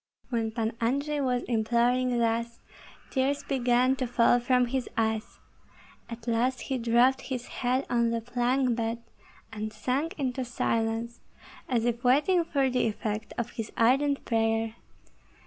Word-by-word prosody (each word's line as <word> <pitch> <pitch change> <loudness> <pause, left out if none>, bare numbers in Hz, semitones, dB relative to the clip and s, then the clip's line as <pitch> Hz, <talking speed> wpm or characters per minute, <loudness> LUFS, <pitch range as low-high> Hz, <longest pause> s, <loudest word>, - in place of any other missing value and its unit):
When 230 -2 0
Pan 225 0 -2
Andrei 280 +5 0
was 250 -3 0
imploring 240 +2 +1
thus, 235 0 0 0.5
tears 275 +1 0
began 255 -1 +2
to 255 - -1
fall 245 0 +4
from 250 +1 +2
his 255 +1 -2
eyes; 220 -1 -1 0.7
at 230 0 -9
last 240 +2 +1
he 265 -2 -2
dropped 240 +3 +3
his 250 -2 -5 0.2
head 255 +2 +1
on 235 -1 +2
the 230 0 0
plank 245 +2 0
bed 230 0 -3 0.5
and 215 0 -4
sank 255 +9 -2
into 260 -2 -2
silence, 230 -1 -1 0.5
as 235 -3 +1
if 240 0 -1
waiting 300 +8 +4
for 280 -5 +1
the 250 -2 +1
effect 215 0 -4
of 235 -1 -2
his 225 -2 -5
ardent 275 +5 +2
prayer. 225 -1 +1
240 Hz, 145 wpm, -28 LUFS, 230-260 Hz, 0.7 s, fall